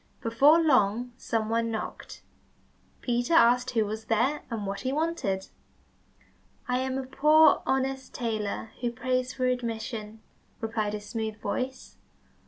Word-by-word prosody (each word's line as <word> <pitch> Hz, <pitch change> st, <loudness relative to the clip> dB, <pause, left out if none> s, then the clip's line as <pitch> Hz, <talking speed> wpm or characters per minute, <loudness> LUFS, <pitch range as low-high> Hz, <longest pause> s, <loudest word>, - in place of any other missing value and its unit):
Before 275 Hz, +8 st, +5 dB
long 245 Hz, -6 st, +2 dB
some 225 Hz, -3 st, -2 dB
one 230 Hz, +1 st, 0 dB
knocked. 220 Hz, -1 st, -6 dB, 0.8 s
Peter 245 Hz, +6 st, 0 dB
asked 250 Hz, -3 st, +5 dB
who 225 Hz, -4 st, +1 dB
was 220 Hz, +1 st, -5 dB
there, 245 Hz, +7 st, +1 dB
and 225 Hz, -4 st, -4 dB
what 195 Hz, 0 st, -3 dB
he 260 Hz, -, -1 dB
wanted? 290 Hz, -, -1 dB, 1.2 s
"I 250 Hz, 0 st, +1 dB
am 260 Hz, 0 st, -2 dB
a 265 Hz, -, -3 dB
poor, 305 Hz, +4 st, +5 dB
honest 265 Hz, 0 st, -1 dB
tailor 220 Hz, -2 st, -3 dB
who 240 Hz, -1 st, 0 dB
prays 255 Hz, 0 st, -1 dB
for 255 Hz, -1 st, -1 dB
admission," 225 Hz, -3 st, -3 dB, 0.4 s
replied 220 Hz, -2 st, -2 dB
a -, -, -4 dB
smooth 220 Hz, 0 st, -4 dB
voice. 260 Hz, +3 st, -4 dB
240 Hz, 135 wpm, -28 LUFS, 220-260 Hz, 1.2 s, Before